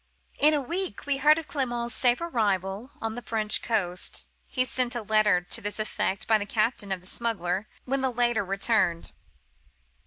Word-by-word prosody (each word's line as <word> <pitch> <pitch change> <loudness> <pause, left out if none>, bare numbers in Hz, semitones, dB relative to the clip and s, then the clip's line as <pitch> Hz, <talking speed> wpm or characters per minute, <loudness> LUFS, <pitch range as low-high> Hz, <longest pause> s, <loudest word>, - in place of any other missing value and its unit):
"In 305 +1 +6
a 290 - +1
week 360 +7 -3
we 285 -1 +1
heard 300 +3 +5
of 325 - -5
Clement's 240 -4 -2
safe 245 +3 +2
arrival 205 - -1
on 225 0 -2
the 245 - -6
French 215 -2 +1
coast. 185 -6 -1 0.2
He 255 -1 +1
sent 250 -1 0
a 240 - -2
letter 210 -3 +3
to 180 - -3
this 205 +1 -3
effect 205 -2 -1
by 220 -1 +4
the 205 - -4
captain 215 -2 0
of 190 -2 -2
the - - -19
smuggler, 195 -2 -2 0.2
when 270 +1 0
the 265 - +2
latter 240 -3 +1
returned. 195 -3 +1
225 Hz, 180 wpm, -27 LUFS, 200-255 Hz, 0.2 s, In